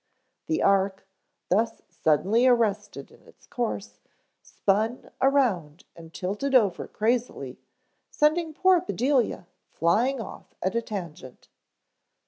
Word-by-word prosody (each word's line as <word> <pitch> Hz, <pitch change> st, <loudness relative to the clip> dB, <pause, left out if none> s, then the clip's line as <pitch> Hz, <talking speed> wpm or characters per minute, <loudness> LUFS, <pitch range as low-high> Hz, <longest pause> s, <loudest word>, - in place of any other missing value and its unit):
The 320 Hz, -, 0 dB
ark, 195 Hz, -1 st, +2 dB, 0.4 s
thus 220 Hz, +5 st, 0 dB
suddenly 200 Hz, -, +2 dB
arrested 210 Hz, -, 0 dB
in -, -, -19 dB
its -, -, -20 dB
course, 105 Hz, 0 st, -4 dB, 0.4 s
spun 215 Hz, +5 st, -1 dB
around 210 Hz, -, +1 dB
and 165 Hz, -1 st, -13 dB
tilted 205 Hz, +11 st, -2 dB
over 205 Hz, -8 st, +3 dB
crazily, 235 Hz, +3 st, -2 dB, 0.5 s
sending 315 Hz, +2 st, +1 dB
poor 370 Hz, +3 st, +3 dB
Bedelia 260 Hz, -, 0 dB, 0.2 s
flying 235 Hz, +11 st, +1 dB
off 225 Hz, -, -9 dB
at 185 Hz, +2 st, 0 dB
a 235 Hz, -, 0 dB
tangent. 170 Hz, -, -8 dB
215 Hz, 110 wpm, -26 LUFS, 180-255 Hz, 0.5 s, over